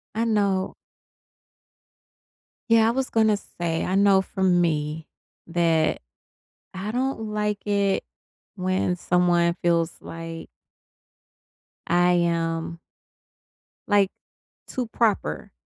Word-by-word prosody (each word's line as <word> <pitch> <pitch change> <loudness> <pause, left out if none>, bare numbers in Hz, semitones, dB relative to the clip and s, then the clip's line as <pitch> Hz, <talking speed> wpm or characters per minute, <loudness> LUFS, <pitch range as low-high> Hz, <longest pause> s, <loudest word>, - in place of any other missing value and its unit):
I 230 - +1
know. 200 -4 +1 2.0
Yeah, 225 -1 +5
I - - +3
was 260 +2 -1
gonna 220 -2 +3
say, 170 -4 -3
I 185 - -1
know 195 -1 +5
from 190 -2 +1
me 155 -1 -1 0.4
that 165 -2 +1 0.7
I 190 +3 -4
don't 245 -3 -2
like 210 -1 -2
it 200 -1 +1 0.5
when 185 -1 0
someone 175 -1 +2
feels 170 -1 +2
like 165 0 -8 1.4
I 175 +1 +3
am 165 -1 -1 1.1
like, 200 -2 +4 0.6
too 250 -3 -3
proper 210 - -1
185 Hz, 95 wpm, -24 LUFS, 170-210 Hz, 2.0 s, Yeah